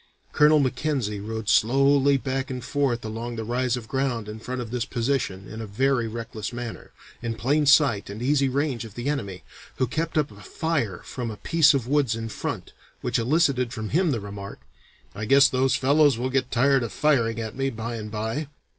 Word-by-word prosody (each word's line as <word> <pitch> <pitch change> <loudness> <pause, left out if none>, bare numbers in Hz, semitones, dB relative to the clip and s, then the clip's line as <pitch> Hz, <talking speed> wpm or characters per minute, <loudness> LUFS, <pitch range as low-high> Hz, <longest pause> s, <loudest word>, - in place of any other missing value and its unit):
Colonel 150 +1 +6
Mackenzie 130 -6 0
rode 110 +1 -5
slowly 135 +6 +4
back 135 0 -3
and 125 -2 -5
forth 130 -5 0
along 115 +2 -5
the 115 - -4
rise 125 +2 0
of 115 -2 -8
ground 130 -5 -1
in 105 +1 -7
front 125 +3 -5
of 115 -3 -5
this 125 -2 -1
position 120 -6 -2
in 110 +1 -7
a 110 - -6
very 120 +3 +1
reckless 110 -2 -5
manner, 120 -1 -7 0.3
in 115 -1 -3
plain 145 +7 +1
sight 135 -10 +4
and 100 +2 -7
easy 135 +2 +2
range 135 -3 -1
of 110 -3 -11
the 120 +2 -4
enemy, 100 - -3 0.3
who 130 - +1
kept 160 +6 -2
up 150 -4 +1
a 100 0 -14
fire 145 - -2
from 120 -3 -5
a 110 - -6
piece 160 0 +4
of 125 -4 -1
woods 135 -5 +2
in 115 0 -5
front, - - -5 0.3
which - - 0
elicited 130 -1 +2
from 110 -3 -5
him 175 +3 +2
the 125 -6 0
remark, 100 -1 -8 0.5
'I 110 +2 -5
guess 140 +4 +6
those 130 0 +1
fellows 140 -1 +4
will 130 +2 -2
get 130 -1 0
tired 135 +2 +3
of 115 - -3
firing 115 -7 +1
at 110 -1 -5
me 135 +1 0
by 115 -1 -5
and 105 -1 -6
by.' 110 +7 -3
125 Hz, 200 wpm, -25 LUFS, 110-140 Hz, 0.5 s, Colonel